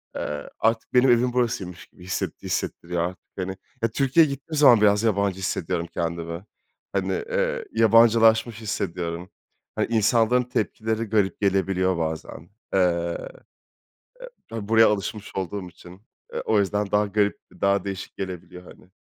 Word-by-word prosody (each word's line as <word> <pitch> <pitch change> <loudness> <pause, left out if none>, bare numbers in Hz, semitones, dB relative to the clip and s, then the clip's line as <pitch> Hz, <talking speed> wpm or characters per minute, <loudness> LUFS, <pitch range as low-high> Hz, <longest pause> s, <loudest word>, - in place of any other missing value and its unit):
eee, 75 -1 -4
artık 115 0 0
benim 125 +1 +5
evim 120 +1 +3
burasıymış 115 -8 -2
gibi 90 - -18
hisset 95 - -4
hissettiriyor 85 0 -2
artık, 90 +1 -5 0.2
hani. 95 0 -3 0.3
Ya, 115 - +3
Türkiye'ye 140 +6 +3
gittiğim 140 +3 -6
zaman 125 -7 +7
biraz 105 0 +4
yabancı 100 -3 +1
hissediyorum 85 -2 -2
kendimi. 85 +1 -4 0.5
Hani, - - 0 0.2
eee, - - -1
yabancılaşmış 115 0 +4
hissediyorum. 90 -4 -3 0.5
Hani, - - 0
insanların 115 +2 +3
tepkileri 110 -1 -2
garip 105 -3 0
gelebiliyor 95 -2 +1
bazen. 80 0 -5 0.2
Eee, 85 -2 +1 1.3
ha 110 -3 -5
buraya 115 0 +6
alışmış 105 0 -3
olduğum 95 0 -4
için, 90 +2 -15 0.3
eee, - - -2
o 110 - +3
yüzden 105 +1 -1
daha 105 0 +3
garip, 100 0 +1 0.2
daha 100 0 +2
değişik 95 -1 -6
gelebiliyor, 90 -1 -7
hani. 90 - -16
100 Hz, 135 wpm, -24 LUFS, 90-115 Hz, 1.3 s, zaman